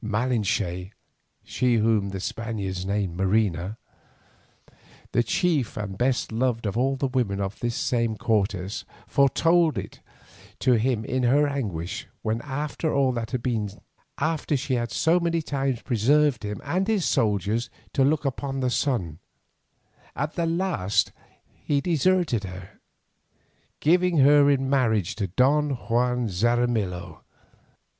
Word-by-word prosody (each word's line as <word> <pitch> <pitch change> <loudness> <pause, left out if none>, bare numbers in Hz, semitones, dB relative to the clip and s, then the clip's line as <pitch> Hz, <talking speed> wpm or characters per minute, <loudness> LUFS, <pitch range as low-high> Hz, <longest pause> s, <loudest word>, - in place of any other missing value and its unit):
Malinche, 105 -5 -1 0.5
she 125 -2 +1
whom 110 -3 +2
the 95 0 -5
Spaniards 100 -3 -4
named 100 -3 -1
Marina, 95 0 0 1.3
the - - +3
chief 150 -1 0
and 100 -2 -4
best 125 +4 0
beloved 115 0 -1
of 100 - -2
all 135 +3 +1
the 135 - -2
women 120 -7 -1
of 100 0 -3
this 120 -1 -2
same 115 -3 0
Cortes, 100 -2 -1 0.2
foretold 165 +4 +3
it - - -6 0.6
to 130 - +2
him 115 -1 +1
in 130 +3 -1
her 140 +4 +3
anguish 100 - -4 0.2
when 110 +1 -1
after 150 +3 -3
all 135 -2 +2
that 115 -2 -3
had 125 -2 -3
been, 110 -5 -1 0.5
after 155 -1 0
she 130 +1 -3
had 120 -1 0
so 165 +2 +3
many 170 -1 0
times 135 -5 -2
preserved 140 +4 +2
him 105 -1 -4
and 185 +3 -1
his 215 -5 +1
soldiers 110 -2 +1 0.2
to 135 - +3
look 150 +2 +2
upon 135 0 -2
the 130 -1 0
sun, 95 - -1 1.0
at 145 +3 -2
the 170 -1 -1
last 165 - 0 0.5
he 145 -1 +1
deserted 170 - +1
her, 95 -1 -9 1.0
giving 175 +2 +3
her 145 +1 +6
in 135 -1 +2
marriage 110 -8 +1
to 100 -1 -3
Don 140 - +2
Juan 125 -1 0
Xaramillo. 110 -2 -1
120 Hz, 135 wpm, -25 LUFS, 105-140 Hz, 1.3 s, her